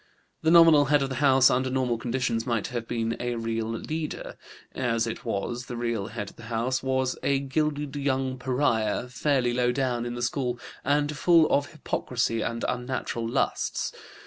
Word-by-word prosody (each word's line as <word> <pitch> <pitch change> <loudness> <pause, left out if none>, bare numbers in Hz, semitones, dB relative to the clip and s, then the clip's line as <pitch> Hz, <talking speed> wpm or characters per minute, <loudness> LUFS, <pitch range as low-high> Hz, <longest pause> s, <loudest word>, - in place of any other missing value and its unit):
The 160 - +2
nominal 165 -3 +7
head 145 0 +3
of 135 - -2
the 130 - -4
house 135 -2 +6
under 130 +1 +1
normal 125 -3 0
conditions 120 -1 -1
might 115 -3 0
have 120 -2 -4
been 115 -1 -1
a 120 0 -2
real 115 -1 -2
leader; 155 +7 -4 0.4
as 115 -3 0
it 115 - -5
was, 120 +5 -3
the 120 - -5
real 115 -4 -2
head 105 -2 -6
of - - -26
the 115 - -11
house 125 +3 0
was 130 -1 0
a 140 -1 +2
gilded 145 +1 -1
young 130 -2 -1
pariah, 125 -3 0
fairly 125 -1 +1
low 125 0 +2
down 125 -2 -1
in 120 - -4
the 120 - -4
school 125 -1 -1 0.2
and 145 +2 +1
full 165 +2 +5
of 145 0 +2
hypocrisy 120 -6 -2
and 115 +1 -2
unnatural 125 -2 -3
lusts. - - -1
125 Hz, 175 wpm, -27 LUFS, 115-140 Hz, 0.4 s, nominal